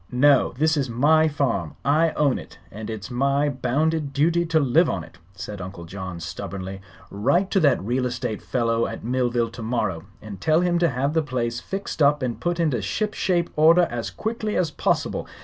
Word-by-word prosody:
"No; 135 Hz, +2 st, +4 dB
this 155 Hz, +2 st, +2 dB
is 135 Hz, -3 st, -1 dB
my 155 Hz, +7 st, +4 dB
farm. 125 Hz, -, -1 dB
I 155 Hz, +4 st, +3 dB
own 145 Hz, -4 st, +1 dB
it, -, -, -12 dB
and 110 Hz, +2 st, -7 dB
it's 110 Hz, +1 st, -6 dB
my 140 Hz, +3 st, +1 dB
bounded 145 Hz, +3 st, -1 dB
duty 170 Hz, +4 st, +2 dB
to 165 Hz, -1 st, +3 dB
live 155 Hz, +5 st, +3 dB
on -, -, -2 dB
it," 90 Hz, -, -16 dB, 0.2 s
said 100 Hz, 0 st, -7 dB
Uncle 90 Hz, -1 st, -8 dB
John, 95 Hz, 0 st, -7 dB
stubbornly. 95 Hz, +3 st, -6 dB, 0.3 s
"Write 170 Hz, -, +1 dB
to 195 Hz, -, +3 dB
that 145 Hz, -, +3 dB
real 125 Hz, +4 st, 0 dB
estate 120 Hz, -2 st, -4 dB
fellow 115 Hz, -2 st, 0 dB
at -, -, -7 dB
Millville 120 Hz, -1 st, 0 dB
tomorrow 115 Hz, -8 st, -2 dB, 0.2 s
and 100 Hz, -3 st, -9 dB
tell 160 Hz, +2 st, +3 dB
him 175 Hz, -1 st, +1 dB
to 170 Hz, -1 st, +3 dB
have 135 Hz, +3 st, -1 dB
the 160 Hz, -, +3 dB
place 120 Hz, -5 st, -2 dB
fixed 195 Hz, 0 st, -5 dB
up 145 Hz, -1 st, +4 dB
and 120 Hz, -3 st, -2 dB
put 175 Hz, +3 st, -1 dB
into 150 Hz, -9 st, +1 dB
ship 210 Hz, -, -2 dB
shape 175 Hz, -2 st, 0 dB
order 165 Hz, +3 st, +6 dB
as 115 Hz, -4 st, -3 dB
quickly 215 Hz, -, -3 dB
as 170 Hz, -4 st, +1 dB
possible. -, -, -1 dB
130 Hz, 190 wpm, -23 LUFS, 115-160 Hz, 0.3 s, order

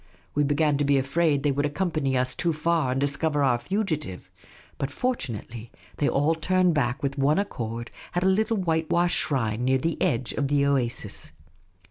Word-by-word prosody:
We 145 Hz, -, +2 dB
began 145 Hz, 0 st, +2 dB
to -, -, +2 dB
be 140 Hz, -1 st, +3 dB
afraid 140 Hz, +1 st, +1 dB
they 145 Hz, -, +2 dB
would 145 Hz, +2 st, 0 dB
accompany 150 Hz, -4 st, -1 dB
us 130 Hz, 0 st, +1 dB
too 170 Hz, -2 st, 0 dB
far 155 Hz, -3 st, +1 dB
and 130 Hz, -, 0 dB
discover 145 Hz, +1 st, +1 dB
our 125 Hz, -3 st, +3 dB
fugitive; 155 Hz, -, -3 dB, 0.5 s
but 135 Hz, -, -1 dB
fortun 145 Hz, -, -2 dB
ately 115 Hz, +1 st, -10 dB, 0.3 s
they 145 Hz, -, +2 dB
all 145 Hz, +4 st, +2 dB
turned 180 Hz, +2 st, +2 dB
back 135 Hz, -3 st, 0 dB
with 140 Hz, 0 st, -2 dB
one 145 Hz, +4 st, +3 dB
accord 120 Hz, -, -3 dB, 0.2 s
at 175 Hz, -, +1 dB
a -, -, +3 dB
little 220 Hz, +4 st, +2 dB
white 160 Hz, -4 st, 0 dB
washed 175 Hz, +1 st, +2 dB
shrine 115 Hz, -5 st, 0 dB
near 130 Hz, +1 st, +3 dB
the 165 Hz, +5 st, -2 dB
edge 120 Hz, 0 st, 0 dB
of 140 Hz, -, -1 dB
the 140 Hz, 0 st, +2 dB
oasis. 120 Hz, -, -1 dB
145 Hz, 185 wpm, -26 LUFS, 130-165 Hz, 0.5 s, be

